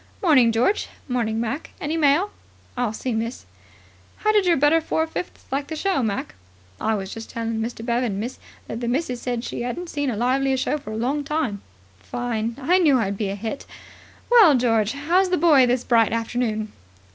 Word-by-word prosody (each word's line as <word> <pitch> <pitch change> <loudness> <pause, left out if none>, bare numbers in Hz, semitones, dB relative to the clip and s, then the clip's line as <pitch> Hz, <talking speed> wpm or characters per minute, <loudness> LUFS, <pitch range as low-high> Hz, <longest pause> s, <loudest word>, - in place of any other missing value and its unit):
"'Morning, 265 -9 +5
George. 245 - +1 0.2
'Morning, 230 -4 -1
Mac. 235 +7 -4
Any 305 +2 -2
mail?" 320 +6 +3 0.4
"I'll 245 -3 0
see, 245 +3 -3
miss." 230 - -3 0.7
"How 430 - +1
did 415 -3 +3
your 340 - +4
better 295 +4 +4
four 320 0 0
fifths 325 +2 -6
like 280 +1 -1
the 320 - -5
show, 370 -1 0
Mac?" 210 -4 -2 0.5
"I 220 0 +1
was 195 -1 -5
just 225 0 -8
telling 230 -1 -3
Mr. 225 0 -4
Bevan, 235 -4 0
miss, 240 +5 -5 0.3
that 230 - -5
the 240 - -2
missus 250 -1 -1
said 245 -2 -2
she 240 - -4
'adn't 330 +9 -4
seen 290 -2 -1
a 225 - -2
livelier 265 +3 +1
show 275 +3 -1
for 275 - -10
a 215 - -4
long 270 +6 -1
time." 280 -9 -2 0.4
"Fine. 230 - -3
I 345 +8 +3
knew 300 -7 +5
I'd 200 -4 -1
be 200 -1 -2
a 195 - -3
hit. 225 +7 -5 0.6
Well, 425 - +8
George, 225 -3 +2
how's 345 +7 +2
the 365 - +2
boy 295 -6 +5
this 245 0 +1
bright 230 -2 +3
afternoon?" 225 -2 -2
250 Hz, 195 wpm, -23 LUFS, 225-295 Hz, 0.7 s, Well